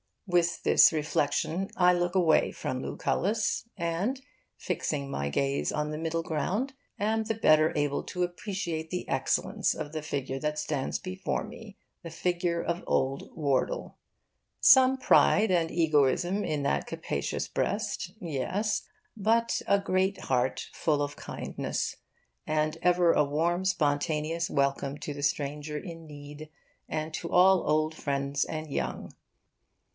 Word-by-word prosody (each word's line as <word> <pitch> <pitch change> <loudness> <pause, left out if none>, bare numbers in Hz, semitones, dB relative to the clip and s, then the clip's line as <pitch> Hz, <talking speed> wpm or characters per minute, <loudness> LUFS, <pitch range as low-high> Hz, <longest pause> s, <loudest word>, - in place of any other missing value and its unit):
With 175 -3 +1
this - - +6
reflection 155 +4 0
I 180 -1 +5
look 175 +1 0
away 170 -4 +3
from 130 0 -4
Lucullus 210 +11 -1
and, 175 +10 -1 0.4
fixing 140 -2 -3
my 70 0 -2
gaze 140 - 0
on 150 0 -1
the 150 - -4
middle 165 +1 -2
ground, 190 - -1 0.2
am 220 +2 0
the 225 - 0
better 155 -7 +4
able 145 -1 0
to 180 -1 -2
appreciate 175 -3 -3
the 180 +1 -4
excellence - - 0
of 150 -1 -5
the 155 0 -4
figure 135 -3 -3
that 150 +1 -2
stands 150 -3 -2
before 185 0 -3
me 220 -2 -11 0.2
the 170 - -7
figure 170 +1 -1
of 170 +1 -2
Old 135 +1 0
Wardle. 140 -5 -1 0.6
Some 265 -1 +7
pride 220 -4 +4
and 170 -3 +2
egoism 165 +4 +2
in 150 -2 -1
that 140 - 0
capacious - - -3
breast, - - -2
yes, 180 +8 -1 0.3
but 230 +3 +2
a 200 - +4
great 190 0 +1
heart 130 0 -1
full 150 -2 0
of 145 0 -5
kindness, - - -4 0.5
and 155 +1 0
ever 175 -1 +4
a 150 - +3
warm 170 +6 0
spontaneous 155 -1 0
welcome 140 0 0
to 145 - -5
the 145 0 -6
stranger 145 +1 -1
in 165 0 -8
need, 145 +1 -10 0.4
and 155 0 -3
to 170 - -5
all 185 +1 +5
old 155 +1 +2
friends 140 -2 -1
and 155 -1 -5
young. 65 - -3
160 Hz, 140 wpm, -29 LUFS, 145-180 Hz, 0.6 s, Some